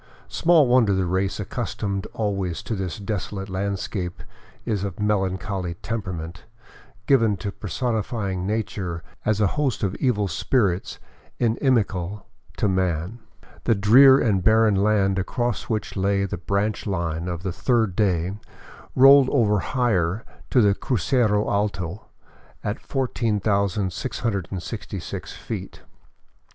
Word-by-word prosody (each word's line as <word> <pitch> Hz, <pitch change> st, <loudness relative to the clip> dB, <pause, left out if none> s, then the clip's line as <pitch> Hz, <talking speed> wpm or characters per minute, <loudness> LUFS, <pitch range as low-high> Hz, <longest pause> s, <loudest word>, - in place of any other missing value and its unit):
Small 165 Hz, -3 st, +4 dB
wonder 120 Hz, -5 st, +4 dB
the 95 Hz, -1 st, +1 dB
race 95 Hz, +3 st, -1 dB
accustomed 100 Hz, -2 st, -3 dB
always 95 Hz, -6 st, -2 dB
to -, -, -4 dB
this 95 Hz, -4 st, -3 dB
desolate 100 Hz, -1 st, -4 dB
landscape 95 Hz, -1 st, -3 dB, 0.4 s
is 105 Hz, -5 st, -1 dB
of 100 Hz, -2 st, -5 dB
melancholy 95 Hz, -3 st, -1 dB
temperament, 90 Hz, -7 st, -5 dB, 0.6 s
given 115 Hz, -7 st, +3 dB
to 100 Hz, +4 st, -4 dB
personifying 105 Hz, -3 st, -2 dB
nature 95 Hz, -6 st, -3 dB, 0.2 s
as 110 Hz, -1 st, +1 dB
a 105 Hz, -, +4 dB
host 135 Hz, +1 st, -1 dB
of 95 Hz, -2 st, 0 dB
evil 105 Hz, -6 st, +1 dB
spirits 95 Hz, -, 0 dB, 0.4 s
inimical 105 Hz, -6 st, 0 dB, 0.3 s
to -, -, +1 dB
man. 95 Hz, +2 st, -1 dB, 0.5 s
The 115 Hz, -, +3 dB
drear 130 Hz, +7 st, +7 dB
and 100 Hz, -8 st, +1 dB
barren 110 Hz, +1 st, +4 dB
land 100 Hz, -1 st, +2 dB
across 120 Hz, +4 st, -2 dB
which 110 Hz, -2 st, -2 dB
lay 100 Hz, 0 st, +1 dB
the 100 Hz, -, -3 dB
branch 100 Hz, +4 st, -1 dB
line 85 Hz, -3 st, -2 dB
of 85 Hz, -1 st, -4 dB
the 95 Hz, -2 st, -2 dB
third 110 Hz, -4 st, +1 dB
day 95 Hz, -1 st, 0 dB, 0.6 s
rolled 135 Hz, 0 st, +7 dB
ever 105 Hz, -7 st, +3 dB
higher 105 Hz, -5 st, 0 dB, 0.2 s
to 125 Hz, -, +4 dB
the 100 Hz, -2 st, +4 dB
Crucero 110 Hz, -1 st, +1 dB
Alto 100 Hz, -2 st, -2 dB, 0.6 s
at 105 Hz, +2 st, -2 dB
14,666 100 Hz, -4 st, -2 dB
feet. -, -, -7 dB
100 Hz, 120 wpm, -24 LUFS, 95-115 Hz, 0.6 s, drear